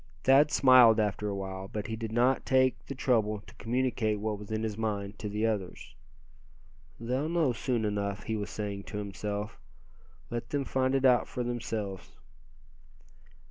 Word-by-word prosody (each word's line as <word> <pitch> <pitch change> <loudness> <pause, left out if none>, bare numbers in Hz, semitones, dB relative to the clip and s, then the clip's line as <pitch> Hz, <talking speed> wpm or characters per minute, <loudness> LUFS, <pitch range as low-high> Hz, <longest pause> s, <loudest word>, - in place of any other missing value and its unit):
Thad 140 +3 +6
smiled 125 -6 +6
after 105 0 0
a 100 - -2
while, 95 -1 -5
but 105 +1 -5
he 110 - -3
did 110 0 -5
not 125 +3 +2
take 130 -1 +2
the 140 - -5
trouble 110 -5 +1
to - - -15
communicate 115 -2 0
what 105 -1 -2
was 105 - -10
in 110 0 -1
his 110 -2 -2
mind 105 -2 -3
to 105 - -4
the 105 +2 -1
others. 105 -5 -3 1.1
"They'll 130 +6 -1
know 165 -7 +2
soon 120 -3 -1
enough," 100 -1 -2
he 110 - -2
was 105 -1 -4
saying 100 -2 -5
to 105 - -6
himself, 105 0 -4 0.7
"let 120 0 -4
them 145 -2 -1
find 130 0 +1
it 135 0 +2
out 125 -2 +4
for 125 - -4
themselves." 110 -5 -4
110 Hz, 170 wpm, -30 LUFS, 105-125 Hz, 1.1 s, Thad